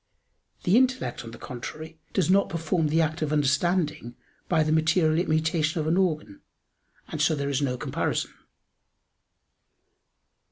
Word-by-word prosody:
The 185 Hz, +6 st, +4 dB
intellect, 255 Hz, -, +1 dB
on 115 Hz, -, -8 dB
the 115 Hz, -, -10 dB
contrary, 155 Hz, +7 st, -8 dB
does 185 Hz, -6 st, +1 dB
not 195 Hz, +2 st, +3 dB
perform 165 Hz, 0 st, 0 dB
the 160 Hz, +2 st, +2 dB
act 160 Hz, +1 st, -1 dB
of 155 Hz, -1 st, -1 dB
understanding 150 Hz, -2 st, 0 dB, 0.3 s
by 160 Hz, -3 st, +3 dB
the 155 Hz, -, -1 dB
material 160 Hz, 0 st, +3 dB
immutation 160 Hz, -1 st, 0 dB
of 155 Hz, -, -1 dB
an 160 Hz, +2 st, +2 dB
organ; 155 Hz, -, -1 dB, 0.7 s
and 150 Hz, -, -4 dB
so 155 Hz, +1 st, +3 dB
there 140 Hz, -1 st, -2 dB
is 140 Hz, +1 st, 0 dB
no 130 Hz, -3 st, -1 dB
comparison. -, -, -2 dB
155 Hz, 145 wpm, -26 LUFS, 150-170 Hz, 0.7 s, The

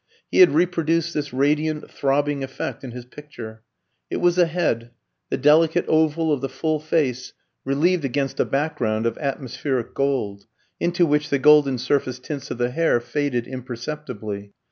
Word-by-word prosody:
He -, -, +2 dB
had 365 Hz, -, +9 dB
reproduced 165 Hz, -1 st, +1 dB
this 145 Hz, -1 st, -3 dB
radiant, 150 Hz, +3 st, 0 dB
throbbing 145 Hz, 0 st, 0 dB
effect 135 Hz, +1 st, -5 dB
in 130 Hz, -, -6 dB
his 120 Hz, 0 st, -8 dB
picture. 120 Hz, -6 st, -10 dB, 0.5 s
It -, -, -2 dB
was 175 Hz, 0 st, +2 dB
a 175 Hz, -, +5 dB
head, 160 Hz, -9 st, -1 dB, 0.4 s
the -, -, -1 dB
delicate 160 Hz, +4 st, +4 dB
oval 160 Hz, 0 st, +2 dB
of 140 Hz, -, -2 dB
the 135 Hz, -, -2 dB
full 155 Hz, +3 st, -1 dB
face 145 Hz, -5 st, -1 dB, 0.3 s
relieved 155 Hz, +6 st, +2 dB
against 135 Hz, 0 st, -2 dB
a -, -, +3 dB
background 135 Hz, -7 st, -1 dB
of 115 Hz, -1 st, -1 dB
atmospheric 135 Hz, -3 st, -3 dB
gold 120 Hz, -8 st, -1 dB, 0.3 s
into 175 Hz, 0 st, +2 dB
which 150 Hz, -1 st, +1 dB
the 140 Hz, -, +2 dB
golden 145 Hz, -1 st, +5 dB
surface 130 Hz, 0 st, 0 dB
tints 140 Hz, +2 st, -6 dB
of -, -, -4 dB
the 120 Hz, 0 st, 0 dB
hair 165 Hz, -3 st, +2 dB
faded 125 Hz, -1 st, -2 dB
imperceptibly. 120 Hz, -5 st, -6 dB
140 Hz, 160 wpm, -23 LUFS, 125-155 Hz, 0.5 s, had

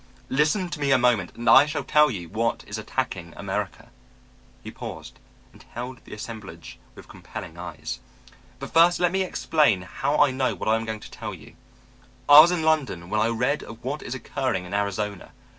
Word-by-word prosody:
Listen 150 Hz, +7 st, +2 dB
to 150 Hz, -, -6 dB
me 140 Hz, -1 st, 0 dB
a 130 Hz, -, +6 dB
moment 120 Hz, -7 st, +1 dB
and 120 Hz, 0 st, -6 dB
I 135 Hz, +5 st, +8 dB
shall 155 Hz, -, -3 dB
tell 150 Hz, 0 st, +4 dB
you 90 Hz, -8 st, -5 dB
what 115 Hz, +5 st, -1 dB
is 105 Hz, +1 st, -6 dB
attacking 95 Hz, -8 st, -4 dB
America." 95 Hz, -4 st, -4 dB, 0.7 s
He -, -, -7 dB
paused -, -, -9 dB, 0.3 s
and -, -, -17 dB
held 125 Hz, +1 st, -7 dB
the -, -, -12 dB
assemblage 105 Hz, -6 st, -9 dB, 0.2 s
with -, -, -13 dB
compelling 85 Hz, -3 st, -9 dB
eyes. 85 Hz, -3 st, -6 dB, 0.6 s
"But -, -, -9 dB
first 170 Hz, +2 st, +5 dB
let 175 Hz, -1 st, +2 dB
me 190 Hz, +1 st, 0 dB
explain 150 Hz, -, +1 dB
how 120 Hz, +9 st, -2 dB
I 145 Hz, -2 st, +5 dB
know 130 Hz, 0 st, 0 dB
what -, -, -6 dB
I 110 Hz, -, +4 dB
am 115 Hz, 0 st, -2 dB
going 110 Hz, -1 st, -5 dB
to -, -, -12 dB
tell 110 Hz, -3 st, -6 dB
you. 80 Hz, -, -15 dB, 0.7 s
I 145 Hz, +1 st, +10 dB
was 160 Hz, +3 st, +9 dB
in 175 Hz, -3 st, -1 dB
London 135 Hz, -, 0 dB
when 105 Hz, 0 st, +1 dB
I 110 Hz, -, +3 dB
read 125 Hz, +5 st, 0 dB
of 115 Hz, +2 st, -11 dB
what 140 Hz, +4 st, -3 dB
is 125 Hz, -, -5 dB
occurring 130 Hz, -8 st, -2 dB
in 90 Hz, -, -9 dB
Arizona. 100 Hz, -1 st, -3 dB
115 Hz, 195 wpm, -25 LUFS, 100-145 Hz, 0.7 s, I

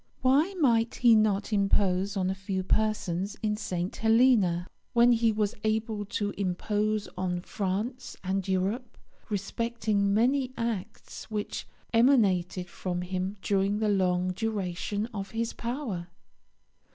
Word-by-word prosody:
Why 290 Hz, +9 st, +3 dB
might 235 Hz, -8 st, +2 dB
he 240 Hz, -2 st, +5 dB
not 215 Hz, -1 st, +2 dB
impose 195 Hz, -1 st, +2 dB
on 185 Hz, -1 st, +1 dB
a -, -, 0 dB
few 190 Hz, 0 st, -3 dB
persons 200 Hz, -1 st, 0 dB
in 210 Hz, -1 st, +1 dB
St. 180 Hz, -3 st, -3 dB
Helena, 220 Hz, -6 st, +4 dB, 0.3 s
when 235 Hz, +1 st, +6 dB
he 230 Hz, -1 st, +3 dB
was 210 Hz, -1 st, 0 dB
able 215 Hz, -1 st, -1 dB
to 205 Hz, 0 st, -2 dB
impose 205 Hz, +3 st, -1 dB
on 180 Hz, -1 st, -2 dB
France 210 Hz, +7 st, -3 dB
and 190 Hz, 0 st, -1 dB
Europe, 200 Hz, +6 st, -1 dB, 0.3 s
respecting 210 Hz, 0 st, -1 dB
many 255 Hz, +5 st, +2 dB
acts 225 Hz, -3 st, -5 dB
which 210 Hz, -1 st, -4 dB, 0.3 s
emanated 195 Hz, -8 st, +3 dB
from 180 Hz, 0 st, -4 dB
him 185 Hz, +2 st, -3 dB
during 200 Hz, 0 st, +1 dB
the 215 Hz, 0 st, +1 dB
long 185 Hz, -2 st, +2 dB
duration 205 Hz, 0 st, -2 dB
of 195 Hz, -2 st, -5 dB
his 230 Hz, +1 st, -2 dB
power? 235 Hz, -8 st, -4 dB
205 Hz, 125 wpm, -28 LUFS, 190-225 Hz, 0.3 s, when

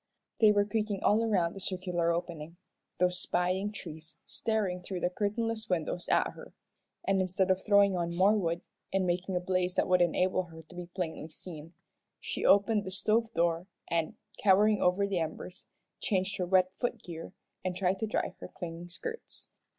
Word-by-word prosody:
They 215 Hz, -2 st, +7 dB
were 205 Hz, -1 st, +3 dB
creaking 210 Hz, -2 st, -1 dB
all 215 Hz, +2 st, +4 dB
around 185 Hz, -7 st, +2 dB
the 195 Hz, -, -8 dB
circular 180 Hz, -3 st, 0 dB
opening 170 Hz, -1 st, -4 dB, 0.4 s
those 180 Hz, 0 st, +2 dB
spying 185 Hz, +3 st, 0 dB
trees 160 Hz, -5 st, -8 dB
staring 205 Hz, -5 st, -1 dB
through 180 Hz, 0 st, -5 dB
the 180 Hz, -, +1 dB
curtainless 220 Hz, +3 st, -1 dB
windows 175 Hz, 0 st, -1 dB
at -, -, +3 dB
her, -, -, -12 dB, 0.5 s
and 195 Hz, -1 st, +3 dB
instead 185 Hz, +1 st, +1 dB
of 185 Hz, 0 st, +1 dB
throwing 200 Hz, -2 st, +5 dB
on 170 Hz, -1 st, -1 dB
more 190 Hz, +4 st, +5 dB
wood, 170 Hz, -4 st, 0 dB, 0.3 s
and 190 Hz, -1 st, +1 dB
making 180 Hz, +1 st, -1 dB
a -, -, +2 dB
blaze 180 Hz, 0 st, 0 dB
that -, -, +2 dB
would 180 Hz, -1 st, +4 dB
enable 185 Hz, +2 st, +2 dB
her 160 Hz, -1 st, -12 dB
to 175 Hz, -, -16 dB
be 175 Hz, -1 st, -6 dB
plainly 170 Hz, -3 st, -4 dB
seen, 165 Hz, 0 st, -10 dB, 0.4 s
she -, -, -4 dB
opened 205 Hz, +1 st, +5 dB
the 190 Hz, -, -5 dB
stove 220 Hz, +4 st, +1 dB
door, 170 Hz, +1 st, +1 dB, 0.2 s
and, 165 Hz, -2 st, 0 dB, 0.2 s
cowering 205 Hz, +1 st, +5 dB
over 180 Hz, +3 st, +3 dB
the 195 Hz, -3 st, 0 dB
embers, 165 Hz, +3 st, -5 dB, 0.3 s
changed 195 Hz, 0 st, 0 dB
her 180 Hz, -2 st, -1 dB
wet 185 Hz, 0 st, +4 dB
foot 240 Hz, -1 st, -3 dB
gear, 165 Hz, +1 st, -8 dB, 0.3 s
and 185 Hz, -1 st, -2 dB
tried 190 Hz, 0 st, +1 dB
to 220 Hz, -, -1 dB
dry 215 Hz, -, -1 dB
her -, -, -7 dB
clinging 170 Hz, 0 st, -7 dB
skirts. 460 Hz, -, -7 dB
185 Hz, 180 wpm, -31 LUFS, 175-200 Hz, 0.5 s, They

